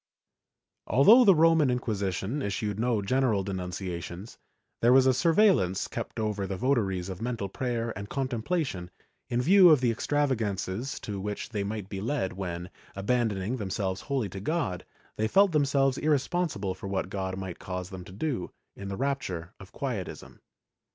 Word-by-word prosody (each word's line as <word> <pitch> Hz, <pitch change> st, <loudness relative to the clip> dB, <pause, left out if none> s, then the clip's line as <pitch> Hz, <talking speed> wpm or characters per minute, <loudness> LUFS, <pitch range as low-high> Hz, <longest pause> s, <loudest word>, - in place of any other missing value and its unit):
^ -, -, -65 dB, 0.8 s
Although 210 Hz, -, +7 dB
the 195 Hz, -3 st, +7 dB
Roman 160 Hz, -3 st, +5 dB
Inquisition 110 Hz, 0 st, -2 dB
issued 100 Hz, -1 st, -2 dB
no 115 Hz, -3 st, +1 dB
general 115 Hz, -2 st, +1 dB
denuncia 90 Hz, -2 st, -4 dB
tions, 90 Hz, +6 st, -9 dB, 0.4 s
there 120 Hz, -, +5 dB
was 130 Hz, 0 st, +6 dB
a 130 Hz, -, +5 dB
surveillance 160 Hz, -, +3 dB
kept -, -, -5 dB
over 105 Hz, -3 st, -1 dB
the 95 Hz, 0 st, -4 dB
votaries 100 Hz, -7 st, 0 dB
of 95 Hz, +1 st, -6 dB
mental 115 Hz, -4 st, -2 dB
prayer 115 Hz, +2 st, -3 dB
and 100 Hz, +2 st, -7 dB
contemplation, 130 Hz, -, -2 dB, 0.4 s
in 120 Hz, +1 st, 0 dB
view 185 Hz, +3 st, +7 dB
of 155 Hz, -4 st, +6 dB
the 125 Hz, -2 st, +2 dB
extravagances 115 Hz, -4 st, -1 dB
to 100 Hz, -2 st, -5 dB
which 105 Hz, +1 st, -4 dB
they 105 Hz, -4 st, -2 dB
might 105 Hz, -1 st, -4 dB
be 95 Hz, -1 st, -5 dB
led 115 Hz, -4 st, -1 dB
when, 90 Hz, -2 st, -5 dB, 0.2 s
abandoning 105 Hz, +1 st, 0 dB
themselves 95 Hz, -2 st, -2 dB
wholly 130 Hz, -7 st, -2 dB
to 95 Hz, -, -7 dB
God, 110 Hz, -, -2 dB, 0.3 s
they 110 Hz, -, +1 dB
felt 195 Hz, -, +4 dB
themselves 140 Hz, -3 st, +2 dB
irresponsible 145 Hz, -, 0 dB
for 95 Hz, +1 st, -8 dB
what 95 Hz, -1 st, -2 dB
God 95 Hz, -1 st, -3 dB
might 95 Hz, -2 st, -6 dB
cause 90 Hz, -1 st, -5 dB
them 95 Hz, -1 st, -7 dB
to 95 Hz, -, -12 dB
do, 110 Hz, -, -3 dB, 0.3 s
in 100 Hz, -, -7 dB
the 95 Hz, 0 st, -4 dB
rapture 120 Hz, -12 st, -3 dB
of 100 Hz, -1 st, -13 dB
Quietism. 105 Hz, -, -5 dB
110 Hz, 165 wpm, -28 LUFS, 95-135 Hz, 0.8 s, Although